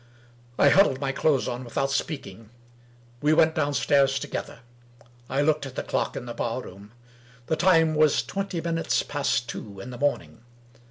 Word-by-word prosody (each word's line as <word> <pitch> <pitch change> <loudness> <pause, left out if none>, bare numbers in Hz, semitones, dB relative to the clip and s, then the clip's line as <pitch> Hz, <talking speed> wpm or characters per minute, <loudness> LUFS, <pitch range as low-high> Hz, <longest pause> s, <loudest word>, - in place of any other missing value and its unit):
I - - +6
huddled 185 -9 +4
my 135 -1 -1
clothes 140 -1 +1
on 120 +1 -4
without 135 +3 -2
speaking. 115 - -4 0.7
We 150 +1 +3
went 160 0 +4
downstairs 140 -3 +2
together. 115 - -6 0.7
I 135 +2 +1
looked 150 -2 +1
at 130 - -11
the - - -3
clock - - -2
in 125 - -5
the 120 - -6
bar 120 +1 -2
room. 100 +3 -12 0.5
The 160 - 0
time 165 -2 +4
was 155 -1 +3
twenty 195 -3 -4
min 165 0 -2
utes 165 - 0
past 140 -4 -1
two 100 -2 -8
in 120 +6 -8
the 120 - -9
morning. 145 -4 -2
140 Hz, 170 wpm, -25 LUFS, 120-155 Hz, 0.7 s, I